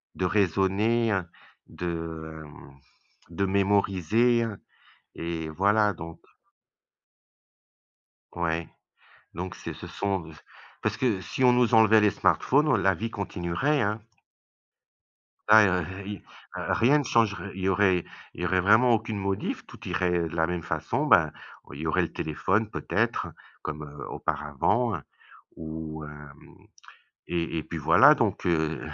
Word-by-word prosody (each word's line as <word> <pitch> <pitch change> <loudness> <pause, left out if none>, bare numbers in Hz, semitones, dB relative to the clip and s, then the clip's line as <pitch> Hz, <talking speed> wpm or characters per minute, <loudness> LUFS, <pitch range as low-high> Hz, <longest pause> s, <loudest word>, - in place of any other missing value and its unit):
de 90 - -1
raisonner, 100 +5 +1
heu, 95 - 0 0.4
de, 80 -2 -6
hem, 70 -2 -15 0.5
de 90 +4 -1
mémoriser 100 +4 +2 0.7
et 85 -1 -4
voilà, 105 +5 +2
donc 85 -1 -9 2.2
ouais, 85 -1 -1 0.7
donc 90 +2 -5
c'est - - -7
ce - - -9
sont 100 -2 -2
de 80 0 -11
c 75 - -15 0.4
parce - - -1
que 115 -7 +1
si 130 - -4
on 125 - +6
nous 125 -1 +2
enlevait 110 0 +6
les 105 - +4
smartphones, 145 +8 +2
la 95 - +3
vie 115 +6 -4
continuerait, 100 - -1
hein. 105 -1 -1 1.5
Ah 110 0 +9 0.4
y 105 +1 -4
heu, - - -15 0.3
rien 140 +6 +2
ne - - -2
changerait 110 -7 0
il 95 0 -7
y - - +1
aurait 95 -2 +2 0.3
il - - -8
y - - -1
aurait 90 +1 +2
vraiment 110 +6 +5
aucune 110 -1 -1
modif, 100 0 -3
tout - - -13
irait 90 0 0 0.2
de 80 - -8
la 80 -1 +1
même 90 -1 -3
façon, 80 - -2
ben, 85 - +5 0.4
il 70 - -8
y 80 - -3
aurait 90 +4 +2
le 85 - -5
téléphone 100 +8 -1
peut-être - - -1 0.3
comme, 75 0 -5
heu, 75 -1 -9
auparavant, 75 - -1
heu, 80 - -6 0.6
ou 80 -1 -6
hem 75 -1 -13 0.7
et 85 -1 -2
et - - -2
puis - - -6
voilà, - - +6
donc, - - -1
heu, 80 -3 0
95 Hz, 145 wpm, -26 LUFS, 80-110 Hz, 2.2 s, Ah